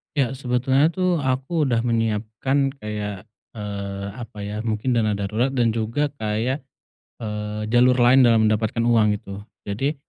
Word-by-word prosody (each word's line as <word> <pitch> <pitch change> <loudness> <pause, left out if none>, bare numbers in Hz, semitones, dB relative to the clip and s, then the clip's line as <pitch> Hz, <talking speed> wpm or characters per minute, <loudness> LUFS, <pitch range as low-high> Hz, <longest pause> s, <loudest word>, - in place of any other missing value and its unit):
Ya 135 -5 +2
sebetulnya 130 +4 +2
tuh 185 -1 +1
aku 135 +3 0
udah 120 -4 +1
menyiapkan 115 +4 0
kayak, 105 -3 -5 0.3
eee, 100 -1 -5
apa 115 -2 -9
ya 105 +1 -4
mungkin 110 +3 -1
dana 110 -3 +1
darurat 110 +6 0
dan 120 -4 +1
juga 115 +6 -1
kayak, 110 +6 -1 0.6
eee, 105 0 -4
jalur 125 +1 +5
lain 125 +1 +5
dalam 115 -3 +5
mendapatkan 110 +2 0
uang 110 -3 +3
gitu, 100 -1 -8 0.2
jadi 135 +9 -2
115 Hz, 145 wpm, -23 LUFS, 105-130 Hz, 0.6 s, jalur